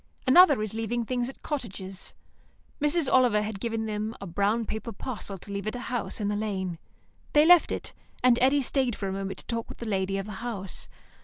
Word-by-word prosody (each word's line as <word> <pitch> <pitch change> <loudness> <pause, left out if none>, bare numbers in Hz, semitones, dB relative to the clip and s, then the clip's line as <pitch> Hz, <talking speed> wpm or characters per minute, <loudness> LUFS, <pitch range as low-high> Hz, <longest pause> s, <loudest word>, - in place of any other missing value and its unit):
Another 280 -3 +7
is 215 - -4
leaving 225 +2 -1
things 245 +1 -1
at 270 - -13
cottages. 195 -9 -5 0.7
Mrs. 295 0 +2
Oliver 245 -5 +5
had 210 -2 -4
given 225 0 -2
them 215 +1 -3
a - - -6
brown 200 +6 +1
paper 220 +2 -4
parcel 210 -2 -6
to 200 +3 -11
leave 200 +1 -4
at 215 - -2
a - - -4
house 245 -3 -3
in 205 - -1
the 205 - 0
lane. 190 -5 -2 0.5
They 295 +1 +6
left 350 0 +7
it, - - -4 0.3
and 250 -1 +5
Eddy 270 +2 +4
stayed 255 -3 +1
for 195 - -4
a - - -2
moment 195 0 -4
to - - -12
talk 230 -1 -3
with - - -9
the 235 - -6
lady 195 -1 0
of 195 - -3
the 215 - -7
house. 205 -6 -4
220 Hz, 215 wpm, -28 LUFS, 200-250 Hz, 0.7 s, Another